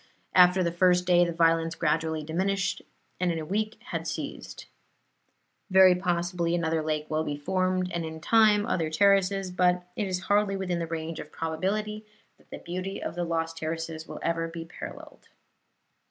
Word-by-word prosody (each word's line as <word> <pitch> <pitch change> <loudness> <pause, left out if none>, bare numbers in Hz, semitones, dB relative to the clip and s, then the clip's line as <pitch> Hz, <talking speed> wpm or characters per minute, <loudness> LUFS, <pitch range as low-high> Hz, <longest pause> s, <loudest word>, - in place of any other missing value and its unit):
After 180 +1 +6
the 170 - 0
first 180 +1 +3
day 175 -1 +5
the 170 - 0
violence 165 0 +2
gradually 160 -1 0
diminished, 195 +5 -1 0.4
and 180 -1 +1
in 165 - -2
a 160 - -4
week 215 +5 -2
had - - -3
ceased. - - -6 1.0
Very 190 -1 +7
possibly 175 -1 -1
another 165 -2 0
lake 155 -1 -2
will 155 0 -1
be 145 -2 -3
formed, 185 +3 0
and 170 -1 -2
in 160 0 -6
time 210 +3 +4
other 165 -8 -1
terraces; 195 +2 +2
but 180 0 +2
it 210 - -2
is 185 -1 -2
hardly 205 +1 +2
within 180 -2 -2
the 165 - -3
range 160 0 -4
of 150 - -9
probability 205 +7 -2 0.4
that - - -26
the - - -7
beauty 185 +2 -5
of - - -4
the 175 +1 -2
lost 165 -1 -2
terraces 160 0 -4
will - - -8
ever 165 0 0
be 165 0 -7
paralleled. 165 - -10
175 Hz, 170 wpm, -27 LUFS, 165-185 Hz, 1.0 s, Very